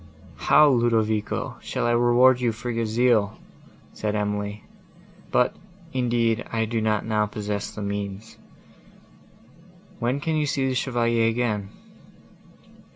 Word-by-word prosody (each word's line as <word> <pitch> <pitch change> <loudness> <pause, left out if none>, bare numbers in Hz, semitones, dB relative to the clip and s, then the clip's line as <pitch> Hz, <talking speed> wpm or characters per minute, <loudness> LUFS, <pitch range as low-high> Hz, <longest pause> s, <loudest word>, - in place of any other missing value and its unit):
"How, 150 +1 +5
Ludovico, 115 -5 0
shall - - -3
I 120 - +2
reward 120 +2 +4
you 120 -2 +2
for 120 +2 -5
your 115 -1 -1
zeal?" 110 -2 +2 0.6
said 105 -1 -2
Emily: 105 0 -2 0.7
"but, 125 - +2 0.4
indeed, 120 -2 +1
I 115 -1 0
do 115 0 -2
not 110 -1 0
now 105 -1 +1
possess 105 -1 -4
the 105 - -7
means. 100 +1 -5 1.6
When 125 +3 0
can 160 +2 -1
you 150 -1 0
see 135 -1 0
the 130 - 0
Chevalier 120 -3 +1
again?" 110 -4 -1
115 Hz, 125 wpm, -24 LUFS, 105-120 Hz, 1.6 s, How